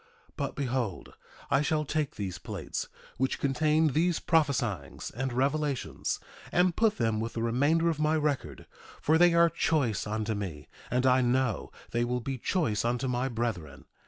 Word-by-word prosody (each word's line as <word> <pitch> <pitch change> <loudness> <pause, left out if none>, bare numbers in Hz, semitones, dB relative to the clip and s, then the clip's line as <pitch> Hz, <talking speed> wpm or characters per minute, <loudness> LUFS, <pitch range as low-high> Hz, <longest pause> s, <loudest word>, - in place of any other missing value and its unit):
1:6 - - -25
But - - -3
behold, 125 -7 -2 0.4
I 140 - +4
shall 150 0 0
take 150 -1 -1
these 95 -4 -4
plates, - - -5 0.3
which 130 +1 0
contain 155 +3 +2
these 165 +5 +1
prophesyings 120 - 0
and 130 +3 -3
revelations, 140 +2 -1 0.3
and 180 -1 +3
put 220 -2 +2
them 110 -2 +1
with 115 +1 -3
the 115 - -2
remainder 145 +8 +2
of 160 -3 0
my 155 +1 +2
record, 150 -3 -2 0.3
for 160 +2 +3
they 175 -1 +6
are 170 0 +6
choice 150 -10 0
unto 110 +1 -1
me; 85 -9 -5 0.2
and 125 +1 +1
I 130 0 +5
know 125 -3 0 0.2
they 120 0 +1
will 125 +1 -1
be 130 +2 -4
choice 115 - 0
unto 120 +2 0
my 125 +1 0
brethren. 95 - -4
130 Hz, 165 wpm, -29 LUFS, 115-155 Hz, 0.4 s, they